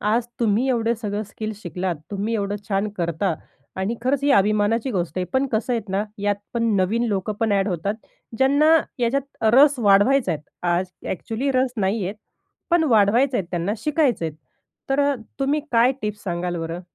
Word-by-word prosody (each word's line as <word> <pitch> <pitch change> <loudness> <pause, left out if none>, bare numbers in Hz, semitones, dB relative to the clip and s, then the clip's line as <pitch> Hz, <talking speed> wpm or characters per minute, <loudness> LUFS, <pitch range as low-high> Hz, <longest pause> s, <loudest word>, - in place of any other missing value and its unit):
आज 225 +3 +1
तुम्ही 230 +3 +2
एवढे 235 -2 +1
सगळं 210 -1 -3
स्किल 215 +1 -6
शिकलात. 180 -2 -3
तुम्ही 205 +3 -2
एवढं 205 -1 -1
छान 200 +1 0
करता 170 +1 -1 0.4
आणि 190 +5 -1
खरंच 270 +2 +1
ही 285 - +2
अभिमानाची 215 +5 +2
गोष्ट 180 -4 -2
आहे. 180 - 0
पण 265 +1 +2
कसं 220 +3 0
आहे 230 - +1
ना, 200 +2 +1
यात 205 0 +1 0.2
पण 235 - 0
नवीन 205 +6 +1
लोकं 200 +1 -1
पण 225 -2 +2
अ‍ॅड 195 0 +2
होतात 195 +3 -2 0.4
ज्यांना 285 +4 +5 0.2
याच्यात 260 +1 -2
रस 280 0 +6
वाढवायचा 220 +6 +4
आहे. 150 -2 -5 0.2
आज 175 +1 +1 0.2
अ‍ॅक्चुअली 230 +9 -3
रस 255 -1 +2
नाही 200 0 0
आहेत, 195 +4 -3 0.6
पण 340 -1 +4
वाढवायचे 235 +6 +4
आहेत. 185 - -2
त्यांना 175 +3 -1
शिकायचं 295 - +1
आहे, 160 - -3 0.6
तर 270 +1 +3
अ, 285 0 +2 0.2
तुम्ही 280 +3 +1
काय 235 +3 +5
टिप्स 210 0 -4
सांगाल 175 -1 -2
बरं? 165 +2 -4
215 Hz, 175 wpm, -22 LUFS, 195-255 Hz, 0.6 s, रस